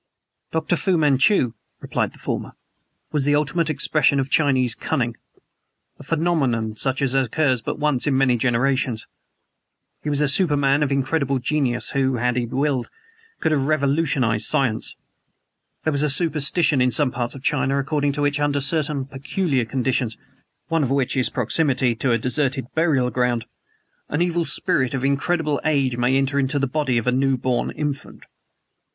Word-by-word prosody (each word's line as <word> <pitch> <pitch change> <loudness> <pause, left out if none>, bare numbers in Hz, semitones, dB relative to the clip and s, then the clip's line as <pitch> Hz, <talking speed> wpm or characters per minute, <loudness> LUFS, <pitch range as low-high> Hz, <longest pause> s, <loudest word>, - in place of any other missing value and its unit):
"Dr. 160 +2 0
Fu 185 0 +1
Manchu," 140 - +3 0.3
replied - - -2
the - - -16
former, - - -4 0.6
"was 145 -3 0
the 145 0 +3
ultimate 150 +2 0
expression 145 -1 +2
of 135 0 -2
Chinese 130 -5 +2
cunning; 120 0 -2 0.8
a - - -11
phenomenon 140 -9 0
such 135 +4 0
as 135 -2 +1
occurs 130 0 +1
but - - -4
once 150 -3 0
in 135 -2 +2
many 135 -2 +3
generations. 125 -1 0 1.0
He 150 - -4
was 145 -1 0
a 150 - +2
superman 145 -3 +2
of 145 -2 0
incredible 140 0 0
genius, 130 -2 0
who, 135 -2 +1
had 125 +1 0
he 120 -1 -1
willed, 135 -1 -1 0.5
could 160 - +1
have 140 -3 +1
revolutionized 140 -6 +1
science. 120 -5 0 0.9
There 155 - 0
is 140 - +1
a 150 - +1
superstition 155 -1 +2
in 125 - +3
some 130 +1 +2
parts 120 0 -3
of 135 - -11
China 135 0 +1
according 140 +1 0
to 145 0 -2
which, 145 0 0
under 145 -1 +1
certain 145 -1 -1
peculiar 135 0 -2
conditions 125 -2 -1 0.5
(one 165 -1 0
of 135 - 0
which 135 -1 0
is 130 -2 +2
proximity 130 0 +1
to 130 - 0
a 115 - +3
deserted 130 +2 0
burial 145 -7 +1
ground) 120 -1 0 0.6
an 150 +4 +1
evil 175 -1 0
spirit 130 -4 0
of 135 0 -2
incredible 150 +2 0
age 140 -5 +1
may 125 +2 +1
enter 135 +1 0
unto 135 +1 0
the 140 - +1
body 135 -2 -1
of 115 - -1
a 125 - +2
new 135 +1 +1
born 125 0 -1
infant. 145 -2 -5
135 Hz, 165 wpm, -22 LUFS, 125-150 Hz, 1.0 s, Manchu